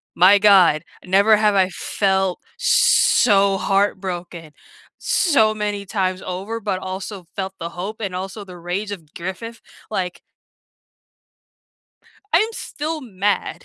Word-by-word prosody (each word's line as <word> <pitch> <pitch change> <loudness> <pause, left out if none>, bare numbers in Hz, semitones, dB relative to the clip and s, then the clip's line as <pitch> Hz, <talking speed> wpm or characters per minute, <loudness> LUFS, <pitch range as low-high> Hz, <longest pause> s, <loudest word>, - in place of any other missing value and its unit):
my 195 +3 +6
god! 185 -7 +5 0.2
Never 200 +4 +4
have 210 -1 +3
I 190 -1 +3
felt 190 0 -1 0.2
so 235 - +4
heartbroken 185 -5 -2 0.5
so 250 - +2
many 205 -1 -3
times 185 -2 -2
over, 195 +5 -5
but 200 -4 -2
also 190 0 -6
felt 190 -1 -4
the 170 0 -4
hope 195 +6 -7
and 195 -4 -3
also 195 +3 -6
the 180 -2 -12
rage 180 +4 -4
of 165 -7 -9
Griffith, 190 +7 -7 0.3
like 180 -4 -3 2.1
I'm 375 +7 +4
still 310 -5 -5
mad 205 - -2
195 Hz, 120 wpm, -20 LUFS, 185-215 Hz, 2.1 s, my